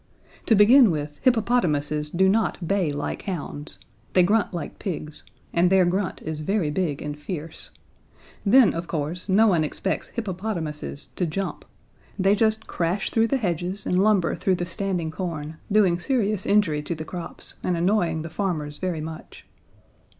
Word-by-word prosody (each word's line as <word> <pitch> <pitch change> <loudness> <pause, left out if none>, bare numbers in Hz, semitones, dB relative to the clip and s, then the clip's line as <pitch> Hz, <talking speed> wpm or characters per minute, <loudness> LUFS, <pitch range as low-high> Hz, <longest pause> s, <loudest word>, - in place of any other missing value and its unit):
To 225 - +5
begin 230 +4 +7
with, 150 -2 -3
hippopotamuses 170 - +1
do 190 +4 +3
not 195 -4 +1
bay 195 -4 +1
like 145 0 -3
hounds: 155 -5 -3 0.4
They 180 - +6
grunt 210 +4 +2
like 175 - -6
pigs, 155 -5 -5 0.3
and 175 +1 +4
their 190 -1 +5
grunt 185 +2 -1
is 155 -1 -4
very 165 -1 0
big 155 -4 -1
and 150 0 -4
fierce. 155 +1 -6 0.7
Then, 235 +2 +6
of 170 +1 -4
course, 165 +5 -3
no 205 +4 +5
one 175 -7 +3
expects 190 +5 -2
hippopotamuses 180 -9 -4
to 180 - +1
jump. 195 +5 -4 0.5
They 195 0 +4
just 220 +1 +2
crash 175 +4 -1
through 225 0 +3
the 275 - +1
hedges 185 -2 -2
and 180 +1 +2
lumber 200 -5 +3
through 190 - +1
the 175 - -3
standing 175 -2 -2
corn, 160 -3 -5
doing 195 -5 +4
serious 210 -4 0
injury 185 -8 +3
to 170 +3 -3
the 155 0 -6
crops, 175 0 -7
and 180 -1 0
annoying 170 -3 +1
the 165 - -7
farmers 160 -6 -2
very 180 -4 -2
much. 160 +1 -9
180 Hz, 160 wpm, -24 LUFS, 155-200 Hz, 0.7 s, begin